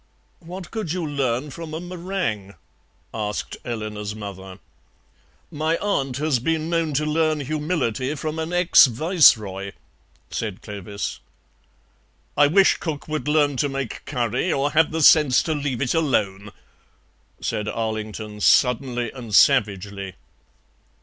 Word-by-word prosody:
"What 180 +2 -9
could 215 -8 -3
you 180 -2 -2
learn 140 -1 -1
from 160 +1 -7
a - - -3
meringue?" 175 - -4 0.6
asked 105 -2 -4
Eleanor's 105 -3 -5
mother. 95 -3 -8 0.9
"My 155 +2 0
aunt 135 -11 -1
has 150 -3 +1
been 160 +5 -1
known 165 -3 0
to 150 +2 +1
learn 155 0 +1
humility 145 -3 -2
from 155 +2 -4
an 160 +1 -3
ex 175 -4 +6
Viceroy," 110 - +3 0.6
said 105 -4 -4
Clovis. 100 -9 -5 1.2
"I 145 - +5
wish 190 +6 +4
cook 155 -4 -5
would 155 -1 -3
learn 145 -2 +2
to 145 - +1
make 135 -3 -5
curry, 125 +5 -1
or 140 +1 0
have 160 0 +3
the 160 0 -1
sense 145 -4 +6
to 160 - -1
leave 140 -4 -2
it 125 - 0
alone," 105 -11 0 0.9
said 105 -1 -3
Arlington, 110 -1 -4
suddenly 125 0 +2
and 115 -6 -5
savagely. 100 -6 +2
135 Hz, 130 wpm, -23 LUFS, 110-155 Hz, 1.2 s, ex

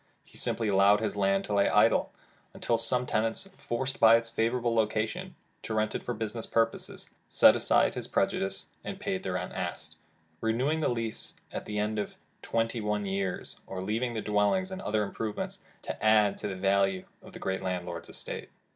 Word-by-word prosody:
He - - -21
simply 115 - -1
allowed 100 +1 +5
his 110 - -2
land 100 -1 +2
to 105 - -3
lie 100 0 +4
idle, - - +4 0.4
until 115 -1 +1
some 125 +2 +2
tenant, 110 -1 0 0.2
forced 130 +3 -3
by 115 0 +8
its 115 0 0
favorable 115 +1 +1
location 110 -1 0 0.3
to 110 - -4
rent 110 0 +1
it - - -2
for 120 - -3
business 110 +1 -3
purposes, 115 0 -1 0.2
set - - +7
aside - - +3
his - - -4
prejudices, 95 0 0
and - - -6
paid 95 - -2
the 95 - -3
rent 90 0 -3
asked, - - -4 0.4
renewing 130 +8 +1
the 155 - +1
lease 115 -2 -4 0.2
at - - -5
the 105 - -4
end 105 +1 0
of 105 - -4 0.3
twenty 115 0 -1
one 105 -1 -1
years, 95 -2 -3
or 95 - -5
leaving 115 +5 -1
the 110 - -2
dwellings 105 - +2
and 190 +1 -5
other 105 - 0
improvements 105 +1 -4 0.2
to - - -6
add 110 -1 +5
to - - -3
the 95 - -4
value 95 0 +2 0.2
of - - -14
the - - -9
great 95 0 -2
landlord's 90 -2 -4
estate. - - -5
110 Hz, 185 wpm, -29 LUFS, 100-115 Hz, 0.4 s, by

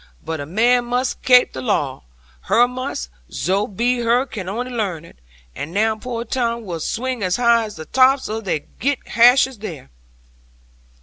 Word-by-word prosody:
But 160 -1 -3
a 145 - -6
man 240 +7 +2
must 250 +2 -1
kape 250 -1 +5
the 130 - -5
law, 130 +1 -1 0.4
her 240 +1 +4
must; 250 - -5 0.2
zo 190 +9 0
be 240 +5 0
her 240 +2 +2
can 200 -8 -6
only 245 +5 -4
learn 195 -9 -3
it. - - -18 0.4
And 150 - -6
now 220 +1 +2
poor 235 +1 -5
Tom 235 -1 -2
will 170 -4 -5
swing 250 +7 -3
as 185 -1 +1
high 235 -1 +3
as 210 - -9
the 160 - -8
tops 265 - +3
of 220 0 -4
they 160 -5 -1
girt 275 - -4
hashes 250 +1 +5
there." 160 - -8
230 Hz, 175 wpm, -20 LUFS, 185-250 Hz, 0.4 s, kape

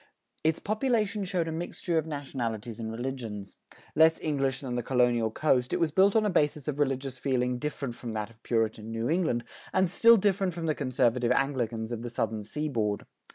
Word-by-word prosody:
Its 160 0 +2
population 215 -2 0
showed 180 -3 -1
a - - -2
mixture 170 0 -1
of 160 - -4
nationalities 120 -6 -4
and 110 -1 -4
religions. 115 -5 -5 0.4
Less 160 +1 +5
English 135 -3 0
than 130 -3 -4
the 120 - 0
colonial 120 -2 +2
coast, 125 0 +1
it - - +1
was 165 -2 +2
built 195 +5 +4
on 220 -1 +4
a - - +2
basis 150 -4 +1
of 150 -1 -2
religious 135 -2 -1
feeling 125 -2 0
different 140 -3 -3
from 120 0 -7
that 110 0 -3
of 115 0 -23
Puritan 110 -2 -1
New 115 +1 -2
England, 160 -8 +1 0.3
and 190 0 +3
still 230 +6 +6
different 195 -3 +1
from 170 -1 -4
the 155 - +2
conservative 125 -3 +1
Anglicans 120 -5 0
of 115 -1 -3
the 120 - -5
southern 110 -2 -2
seaboard. 110 -4 -2
135 Hz, 190 wpm, -29 LUFS, 115-160 Hz, 0.4 s, still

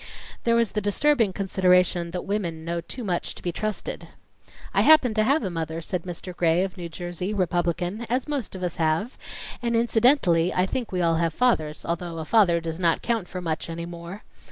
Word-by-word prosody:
There 230 0 +4
was 230 -2 +2
the 210 - -1
disturbing 225 +2 +2
consideration 180 -2 +2
that 180 +1 -4
women 170 -6 -2
know 170 0 -2
too 245 +8 -7
much 180 -4 -2
to - - -12
be 175 - -1
trusted. 215 +4 -4 0.7
"I - - +4
happen 305 -7 +6
to 215 0 +2
have 275 +6 +2
a 190 - -2
mother," 165 -1 -3
said 170 +1 -4
Mr. 180 0 -7
Gray 170 +1 +3
of 190 -1 -4
New 175 -3 -6
Jersey, 175 +4 -4
Republican, 180 +3 -1
"as 250 +4 0
most 280 -10 -3
of 185 - -6
us 175 -2 -3
have, 165 +9 0 0.5
and 235 -1 0
incidentally 225 - +3
I 180 - +3
think 235 +4 -3
we 180 -1 -1
all 165 -1 +3
have 165 -1 0
fathers, 160 -12 +1
although 170 0 -3
a 160 - -4
father 180 -4 +4
does 165 0 -5
not 170 -3 +2
count 225 -6 -1
for 180 0 -6
much 165 -1 -3
any 170 0 -4
more. 170 +3 -8
180 Hz, 205 wpm, -25 LUFS, 170-215 Hz, 0.7 s, happen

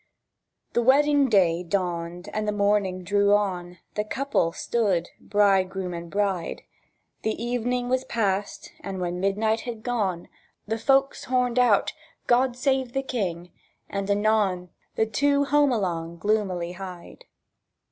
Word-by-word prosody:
The 240 - +2
wedding 280 +2 +4
day 180 -5 +3
dawned 175 0 -3
and 215 0 -2
the - - +2
morning 200 -3 +1
drew 200 +2 +3
on; 180 -4 -2 0.2
The 210 - -1
couple 235 -6 0
stood 195 -5 0
bridegroom 190 -3 +1
and 170 0 -7
bride; 195 -4 -1 0.6
The 220 - -1
evening 245 +1 -1
was 255 +1 +1
passed, 200 -3 -2
and 195 -1 -6
when 180 0 -2
midnight 215 +4 +1
had 230 -2 -7
gone 200 -8 -1 0.4
The 225 +2 -2
folks 270 +3 +2
horned 250 -1 +1
out, 235 -5 +3 0.3
"God 250 0 +2
save 265 -1 0
the 270 - -1
King," 180 -9 -3 0.4
and 200 0 -3
anon 200 -3 +1 0.3
The 220 - +2
two 280 +6 +2
home 290 0 +3
along 170 -6 -2
gloomily 190 -4 0
hied. 185 - -9
205 Hz, 135 wpm, -25 LUFS, 180-245 Hz, 0.6 s, wedding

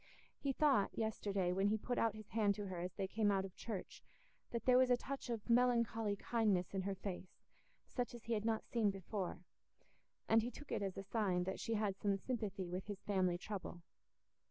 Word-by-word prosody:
He 280 - 0
thought, 270 -7 +3
yesterday 200 -4 0
when 195 +2 +2
he 215 +1 +3
put 245 +3 -2
out 225 -2 +2
his 215 -1 -10
hand 210 -3 +2
to 205 - -4
her 185 -2 -4
as 180 +1 -4
they 195 -2 -1
came 210 +1 +2
out 195 -1 +2
of 190 - -9
church, 215 -5 -5 0.5
that 235 - -3
there 255 0 +7
was 255 -1 +5
a 245 - +5
touch 270 +1 -5
of 225 -3 -3
melancholy 235 -3 +3
kindness 200 -5 +1
in 195 - 0
her 195 +1 -2
face, 185 -1 -6 0.4
such 245 -1 -3
as 235 - -10
he 230 - -1
had 210 -2 0
not 220 -1 0
seen 225 -4 +2
before, 195 -2 -4 0.8
and 225 0 +6
he 235 - -2
took 290 +3 -11
it - - 0
as 195 -2 -2
a 195 - -3
sign 195 -3 +1
that 190 +1 -3
she 225 - -1
had 205 -2 0
some 200 -1 +2
sympathy 200 -5 -3
with 180 +3 -4
his 205 -2 -6
family 185 -3 +2
trouble. 180 -2 -6
205 Hz, 210 wpm, -39 LUFS, 190-230 Hz, 0.8 s, there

